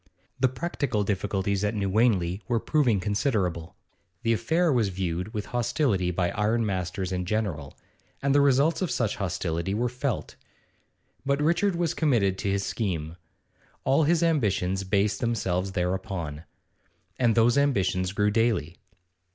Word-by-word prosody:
The 130 - +4
practical 130 -5 -2
difficulties 100 0 -1
at 105 +2 0
New 100 -2 -1
Wanley 95 -3 +2
were 120 -3 +1
proving 125 -7 +2
considerable; 100 - -1 0.5
the 115 - +3
affair 165 +7 +1
was 115 -5 +2
viewed 90 +1 -3
with 105 -2 -4
hostility 115 - +1
by 90 0 0
ironmasters 100 -4 -1
in 90 -1 -1
general, 90 -8 -3 0.4
and 140 0 +1
the 145 - +5
results 140 +5 +3
of 185 - 0
such 110 -4 -1
hostility 90 -1 -2
were 120 +3 0
felt. 125 +1 -3 0.9
But 140 +1 0
Richard 170 +5 +2
was 170 -1 0
committed 105 -11 +1
to 100 - -1
his 100 0 0
scheme; 85 -7 -3 0.7
all 135 +4 +3
his 170 +2 +2
ambitions 100 - +1
based 100 +2 +1
themselves 95 -6 -1
thereupon. 90 -4 -3 0.7
And 120 -3 +3
those 115 +1 +4
ambitions 95 -10 +1
grew 105 +1 +1
daily. 110 -8 0
105 Hz, 140 wpm, -26 LUFS, 95-125 Hz, 0.9 s, the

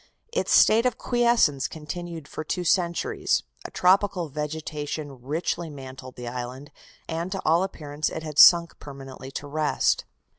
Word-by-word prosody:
Its - - -1
state 230 +3 +6
of 245 -2 -2
quiescence 235 - +2
continued 165 0 -7
for 155 - -6
two 180 +3 -2
centuries, 170 0 +1 0.2
a - - -5
tropical 185 -2 +2
vegetation 150 -2 -5
richly 160 +5 -2
mantled 130 -2 -10
the 125 -1 -7
island, 125 +3 -6 0.4
and 165 +3 -3
to 195 - -3
all 165 +3 +4
appearance 150 -5 -3
it 160 - -6
had 150 -2 -3
sunk 170 -1 +7
permanently 135 -2 -10
to 135 - -6
rest. 150 +1 0
155 Hz, 145 wpm, -25 LUFS, 140-175 Hz, 0.4 s, sunk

